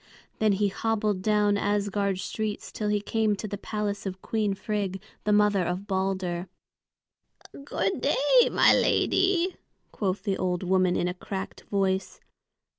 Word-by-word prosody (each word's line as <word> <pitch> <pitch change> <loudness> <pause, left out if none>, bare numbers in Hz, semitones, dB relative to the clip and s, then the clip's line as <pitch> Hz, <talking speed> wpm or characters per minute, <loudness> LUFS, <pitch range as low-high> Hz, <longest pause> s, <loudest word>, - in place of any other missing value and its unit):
Then 215 -2 +3
he 200 +1 +1
hobbled 210 -2 -1
down 210 0 +2
Asgard 200 -1 0
streets 215 +2 -4
till 210 - -3
he 210 -1 +1
came 215 0 +1
to 215 - -5
the 205 - -4
palace 205 0 -3
of 190 0 -5
Queen 210 -3 0
Frigg, 195 -2 -3 0.3
the 210 - +2
mother 205 -2 +4
of 180 +3 -3
Balder. 190 -2 -2 1.2
"Good 285 - -1
day, - - +4
my - - +6
lady," 375 -1 +2 0.3
quoth 195 -2 -2
the 195 -3 -1
old 180 -1 -1
woman, 185 -1 +2
in 175 - 0
a 180 - -2
cracked 190 +1 -6
voice. 190 -1 0
205 Hz, 145 wpm, -27 LUFS, 190-210 Hz, 1.2 s, my